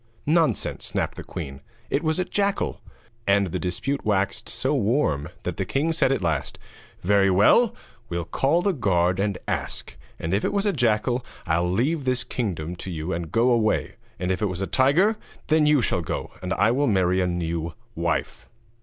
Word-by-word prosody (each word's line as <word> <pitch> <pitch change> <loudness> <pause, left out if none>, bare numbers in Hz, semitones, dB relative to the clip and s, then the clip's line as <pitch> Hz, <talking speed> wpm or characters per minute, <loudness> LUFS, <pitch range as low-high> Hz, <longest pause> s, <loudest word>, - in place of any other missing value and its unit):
'Nonsense!' 160 +1 +1
snapped - - -2
the - - -7
queen. 70 -4 -7 0.3
'It 140 - +2
was 155 -1 0
a 185 - 0
jackal.' 200 +1 -1 0.5
And 100 -2 +3
the - - -2
dispute 130 +10 -2
waxed 100 +1 0
so 130 +5 0
warm 110 - +1
that - - -3
the - - 0
king 155 +4 0
said 145 -4 +2
at 135 - 0
last: 80 -5 -1 0.4
'Very 100 +1 +4
well, 200 - +5 0.3
we'll 85 -1 -2
call 155 - +1
the 200 - +2
guard 90 - +1
and 100 -1 0
ask; - - -3 0.2
and 80 +3 -3
if 100 - +1
it - - 0
was 200 0 +1
a 205 - +2
jackal 120 -1 +1 0.2
I'll 85 +2 +1
leave 135 - 0
this 130 -1 +1
kingdom 90 -8 -3
to 95 - -7
you 85 +1 -3
and 85 -1 -4
go 120 +2 +3
away; 110 -3 +1 0.3
and 90 0 -1
if 95 - -1
it 105 - +2
was 90 -1 -4
a - - +1
tiger 165 - +3 0.3
then 155 -1 +4
you 150 -3 +5
shall 90 - +1
go, 80 - -4
and 90 0 -4
I 105 +2 +3
will 140 +4 +2
marry 95 -3 +2
a 90 - +1
new 85 -2 -2 0.2
wife.' - - -2
105 Hz, 190 wpm, -24 LUFS, 90-140 Hz, 0.5 s, well